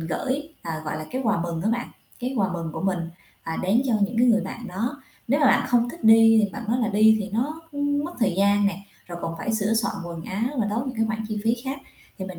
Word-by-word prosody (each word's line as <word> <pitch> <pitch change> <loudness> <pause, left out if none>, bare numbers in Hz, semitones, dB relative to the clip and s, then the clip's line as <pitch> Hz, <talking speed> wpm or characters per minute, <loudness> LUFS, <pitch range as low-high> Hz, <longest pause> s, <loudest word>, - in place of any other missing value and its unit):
gửi, 265 - -2
ờ, 160 -2 -4
gọi 155 - -3
là, 155 - -7
cái 260 - -2
quà 215 -6 +2
mừng 170 -1 -3
á 220 - +1
bạn, 240 +2 -2 0.3
cái 255 +2 -3
quà 195 -4 +1
mừng 165 -2 -4
của - - -5
mình, 190 -2 +1 0.4
à, 165 - -4
đến 205 +7 +3
cho 235 - +2
những 220 +3 0
cái 245 - +5
người 230 -3 +5
bạn 235 -1 -6
đó. 240 +9 -3 0.3
Nếu 280 +4 +2
mà 285 - +5
bạn - - +4
không 240 0 +3
thích 335 +2 -9
đi 225 0 +7
thì 205 - -1
bạn 245 - -6
nói 240 +2 +2
là 225 - +1
đi 220 +1 +5
thì 200 - -4
nó, 295 +8 -1
ưm, 285 0 0
mất 345 - -5
thời 230 -7 +2
gian 200 +1 +3
nè, 195 -1 -1 0.3
rồi 175 -1 -7
còn 165 - -3
phải 225 - -2
sửa 215 +1 +1
soạn 225 0 0
quần 170 -1 -7
áo 200 +4 -2 0.2
và 210 - +1
tốn 235 +5 -1
những 255 -2 -5
cái 225 - +2
khoản 220 0 -3
chi 215 - -2
phí 230 +1 +3
khác. 270 +1 -3 0.4
Thì 190 - -4
mình 185 -2 -8
220 Hz, 275 wpm, -24 LUFS, 190-245 Hz, 0.4 s, đi